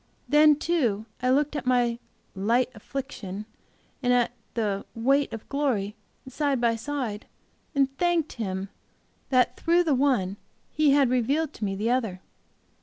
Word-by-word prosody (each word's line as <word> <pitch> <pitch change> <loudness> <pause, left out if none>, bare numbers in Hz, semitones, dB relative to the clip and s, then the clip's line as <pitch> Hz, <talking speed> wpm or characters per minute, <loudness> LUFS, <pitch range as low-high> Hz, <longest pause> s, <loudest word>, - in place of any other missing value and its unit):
Then, 300 +3 +6
too, 260 -10 0 0.2
I 250 - +1
looked 290 +3 +2
at 275 - -4
my 240 -2 +2 0.3
'light 230 +7 +1
affliction,' 210 -4 -6 0.6
and 245 -2 +2
at 245 -1 +3 0.2
the 205 -4 -1
'weight 275 +4 +2
of 225 -2 -7
glory' 240 -8 -1 0.3
side 275 0 0
by 235 -1 +2
side, 230 -4 -4 0.5
and 275 -1 +2
thanked 345 -3 +1
Him 195 -3 -4 0.6
that 255 -2 +3
through 340 +1 +3
the 315 -4 +2
one 250 -8 +1 0.3
He 305 -1 +3
had 275 -3 +4
revealed 275 +6 +1
to 215 - -4
me 195 -1 -2
the 215 +4 0
other. 225 -8 0
250 Hz, 145 wpm, -26 LUFS, 220-285 Hz, 0.6 s, Then